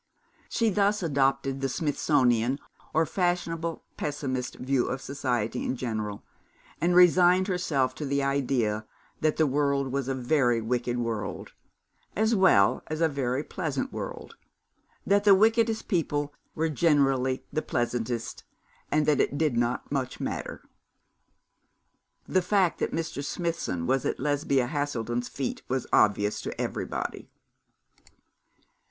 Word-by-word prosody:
She 225 Hz, -2 st, +1 dB
thus 200 Hz, +1 st, +2 dB
adopted 135 Hz, -2 st, +1 dB
the 135 Hz, -, 0 dB
Smithsonian, 130 Hz, -5 st, +1 dB, 0.3 s
or 160 Hz, +1 st, +2 dB
fashionable 170 Hz, -2 st, -1 dB
pessimist 130 Hz, -4 st, -3 dB
view 130 Hz, -1 st, 0 dB
of 130 Hz, -, -2 dB
society 125 Hz, -4 st, -2 dB
in -, -, -1 dB
general, 110 Hz, -5 st, -4 dB, 0.6 s
and 175 Hz, +1 st, +2 dB
resigned 180 Hz, +1 st, +6 dB
herself 165 Hz, -8 st, 0 dB
to 150 Hz, -, -5 dB
the 140 Hz, 0 st, 0 dB
idea 125 Hz, -6 st, 0 dB, 0.3 s
that 155 Hz, -1 st, +1 dB
the 160 Hz, -, +4 dB
world 140 Hz, -1 st, +1 dB
was 135 Hz, -1 st, -2 dB
a 135 Hz, -, -1 dB
very 125 Hz, -2 st, +2 dB
wicked 120 Hz, +1 st, -1 dB
world, 115 Hz, -3 st, -4 dB, 0.6 s
as 220 Hz, +2 st, +2 dB
well 190 Hz, -, +4 dB
as 155 Hz, 0 st, -4 dB
a 165 Hz, -, +4 dB
very 135 Hz, -2 st, -1 dB
pleasant 155 Hz, -8 st, -3 dB
world, -, -, -6 dB, 0.7 s
that 200 Hz, +1 st, +3 dB
the 200 Hz, -2 st, +7 dB
wickedest 225 Hz, +2 st, +2 dB
people 145 Hz, -5 st, -1 dB, 0.2 s
were 160 Hz, +1 st, +1 dB
generally 135 Hz, -4 st, +2 dB
the 155 Hz, -, 0 dB
pleasantest, 120 Hz, -2 st, -2 dB, 0.5 s
and 150 Hz, 0 st, +2 dB
that 150 Hz, -2 st, +3 dB
it 145 Hz, -, +1 dB
did 150 Hz, -5 st, +1 dB
not 120 Hz, +1 st, -1 dB
much 130 Hz, -3 st, -2 dB
matter. -, -, -4 dB, 1.6 s
The 185 Hz, -, +2 dB
fact 185 Hz, -1 st, +2 dB
that -, -, -1 dB
Mr. 160 Hz, -3 st, -3 dB
Smithson 165 Hz, -, -2 dB
was 135 Hz, +4 st, +1 dB
at -, -, -2 dB
Lesbia 140 Hz, -2 st, +1 dB
Haselden's 120 Hz, -4 st, -2 dB
feet 135 Hz, -2 st, -4 dB
was 130 Hz, 0 st, -1 dB
obvious 105 Hz, 0 st, +3 dB
to -, -, -6 dB
everybody. -, -, -4 dB
140 Hz, 130 wpm, -27 LUFS, 125-165 Hz, 1.6 s, the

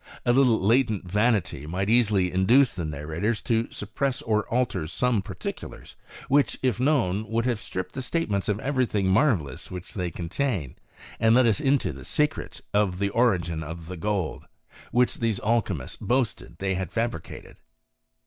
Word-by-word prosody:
A 120 Hz, -, +4 dB
little 125 Hz, -4 st, +4 dB
latent 110 Hz, -1 st, +2 dB
vanity 105 Hz, -, +1 dB
might 95 Hz, +4 st, -2 dB
easily 105 Hz, -6 st, +3 dB
induce 115 Hz, +9 st, +4 dB
the 85 Hz, -3 st, -4 dB
narrators 80 Hz, +9 st, -2 dB
to 115 Hz, 0 st, 0 dB
suppress 125 Hz, +6 st, -2 dB
or 105 Hz, -2 st, 0 dB
alter 115 Hz, -9 st, 0 dB
some 120 Hz, +5 st, +1 dB
particulars, 95 Hz, -, -7 dB, 0.3 s
which, 145 Hz, +1 st, +3 dB
if 125 Hz, -5 st, +1 dB
known, 110 Hz, -7 st, +1 dB
would 115 Hz, +1 st, 0 dB
have 120 Hz, -4 st, 0 dB
stripped 95 Hz, -2 st, -5 dB
the 130 Hz, -, -4 dB
statements 115 Hz, -, -1 dB
of 105 Hz, 0 st, 0 dB
every 130 Hz, -3 st, +1 dB
tiling 100 Hz, -3 st, 0 dB
mar 120 Hz, +6 st, +4 dB
vellous 70 Hz, -5 st, -8 dB
which 90 Hz, -1 st, -8 dB
they 90 Hz, -3 st, -2 dB
contain, 85 Hz, -, -2 dB, 0.5 s
and 110 Hz, +1 st, +5 dB
let 130 Hz, 0 st, +5 dB
us 110 Hz, -4 st, +3 dB
into 140 Hz, 0 st, +2 dB
the -, -, -10 dB
secret 150 Hz, +1 st, -1 dB
of 100 Hz, -3 st, +2 dB
the 100 Hz, +1 st, 0 dB
origin 90 Hz, -9 st, +1 dB
of 80 Hz, +2 st, -7 dB
the 90 Hz, -, -6 dB
gold, 95 Hz, -1 st, -2 dB, 0.5 s
which 125 Hz, 0 st, +2 dB
these 115 Hz, -4 st, 0 dB
alchymists 110 Hz, -, -1 dB
boasted 120 Hz, -9 st, -1 dB
that -, -, -22 dB
they 95 Hz, 0 st, -1 dB
had 95 Hz, -1 st, -3 dB
fabricated. 115 Hz, -7 st, -4 dB
105 Hz, 170 wpm, -26 LUFS, 90-120 Hz, 0.5 s, and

